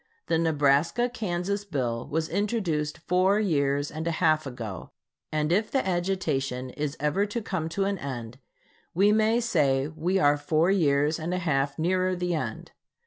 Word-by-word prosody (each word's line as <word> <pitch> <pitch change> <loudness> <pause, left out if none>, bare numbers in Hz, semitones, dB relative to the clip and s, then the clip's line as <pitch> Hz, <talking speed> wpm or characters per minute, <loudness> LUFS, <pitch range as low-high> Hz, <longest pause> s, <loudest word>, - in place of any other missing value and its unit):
The 165 - +1
Nebraska 160 - +2
Kansas 200 -2 -2
bill 125 -10 -3
was 160 +2 -1
introduced 190 -8 -1
four 185 +3 +3
years 145 -7 +1
and 160 +2 -4
a 165 - -1
half 155 -3 +2
ago, 115 -7 -7 0.4
and 155 0 0
if 210 +5 +2
the 265 -8 0
agitation 150 -9 -1
is 150 +2 -4
ever 150 +8 +1
to 205 +3 -3
come 185 -7 -3
to 195 +4 -1
an 200 -1 -1
end, 125 -3 -6 0.6
we 200 +4 +5
may 220 +2 +3
say 140 - +1
we 165 +4 -1
are 145 -5 +4
four 155 +4 +2
years 150 -3 +2
and 170 +3 -2
a - - 0
half 140 -5 0
nearer 185 +3 +1
the 180 0 -1
end. 160 - -4
160 Hz, 165 wpm, -27 LUFS, 145-190 Hz, 0.6 s, we